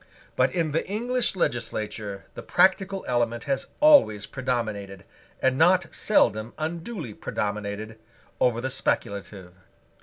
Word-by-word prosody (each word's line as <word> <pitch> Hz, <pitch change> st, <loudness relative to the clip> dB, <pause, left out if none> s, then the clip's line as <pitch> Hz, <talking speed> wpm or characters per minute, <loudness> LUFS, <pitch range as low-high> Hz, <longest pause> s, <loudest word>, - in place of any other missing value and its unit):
But 130 Hz, +1 st, +3 dB
in 160 Hz, +1 st, 0 dB
the 160 Hz, -, 0 dB
English 240 Hz, +3 st, 0 dB
legislature 110 Hz, -, -3 dB
the -, -, -7 dB
practical 190 Hz, 0 st, +2 dB
element 120 Hz, -2 st, 0 dB
has 135 Hz, -1 st, -2 dB
always 285 Hz, -, +6 dB
predominated, 110 Hz, -7 st, -3 dB, 0.4 s
and 130 Hz, 0 st, +2 dB
not 180 Hz, +1 st, +4 dB
seldom 110 Hz, -, +2 dB
unduly 165 Hz, -, -4 dB
predominated, 105 Hz, +2 st, -4 dB, 0.4 s
over 120 Hz, -1 st, +2 dB
the 130 Hz, +1 st, -2 dB
speculative. 100 Hz, -7 st, -3 dB
125 Hz, 115 wpm, -26 LUFS, 105-170 Hz, 0.4 s, always